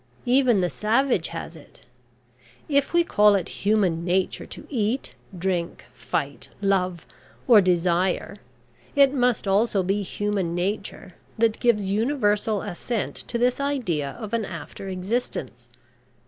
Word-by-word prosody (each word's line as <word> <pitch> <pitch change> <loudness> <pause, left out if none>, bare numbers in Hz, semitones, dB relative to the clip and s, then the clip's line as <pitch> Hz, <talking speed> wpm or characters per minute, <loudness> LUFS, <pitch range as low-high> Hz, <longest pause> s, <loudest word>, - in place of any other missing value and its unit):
Even 245 -4 +4
the 180 - +1
savage 220 - +1
has 165 0 -7
it. 155 - -16 0.8
If 280 -2 +1
we 345 0 +4
call 210 -9 +4
it 185 -4 -1
human 195 -5 +2
nature 180 +1 0
to - - -10
eat, 235 -1 -2 0.2
drink, 175 -1 -2
fight, - - -4
love, 185 -4 0 0.4
or 230 -5 +8
desire, 180 +2 +1 0.6
it 280 -1 +5
must 245 -5 +1
also 200 0 +2
be 195 +3 0
human 200 -3 -2
nature 195 0 -3 0.2
that 225 -1 +2
gives 210 -5 +2
universal 210 -3 +1
assent 205 +3 -3
to 240 - -2
this 245 +2 +1
idea 220 - -1
of 220 -1 -7
an 230 -1 +1
after 190 +1 -7
existence. 185 - -4
205 Hz, 130 wpm, -24 LUFS, 180-235 Hz, 0.8 s, or